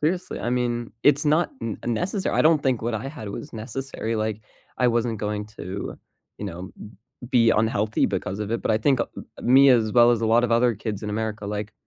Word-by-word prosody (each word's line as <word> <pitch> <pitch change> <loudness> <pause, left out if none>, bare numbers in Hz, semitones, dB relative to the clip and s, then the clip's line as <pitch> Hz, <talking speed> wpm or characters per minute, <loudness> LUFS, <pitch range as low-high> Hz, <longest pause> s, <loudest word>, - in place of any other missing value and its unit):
seriously, 180 +4 -1
I - - -2
mean, 120 -2 -1
it's 145 +1 +4
not 155 +3 +2
n 115 -2 -4
necessary, 180 - -1
I - - +4
don't 155 -2 +4
think 130 -4 0
what 115 0 -1
I 130 +5 -3
had 130 -8 -8
was - - -7
necessary, 115 0 -4
like, 110 0 -2 0.4
I 125 -1 +4
wasn't 115 -1 0
going 105 0 -3
to, 95 +3 -6 0.4
you 105 - -5
know, 90 -1 -6
b - - -8 0.4
be 115 -2 +5
unhealthy 110 -1 +1
because 95 +1 -3
of 105 - -3
it, 115 - -2
but - - 0
I 110 - +3
think 130 +2 +2
a - - 0 0.3
a - - -9
me 135 +3 +6
as 110 -3 +3
well 120 0 +6
as 115 -2 +2
a 115 - 0
lot 115 +2 +4
of 120 - -1
other 120 0 +3
kids 105 0 -5
in 105 - -3
America, 105 -1 -3
like, 105 +1 -4
115 Hz, 230 wpm, -24 LUFS, 105-125 Hz, 0.4 s, me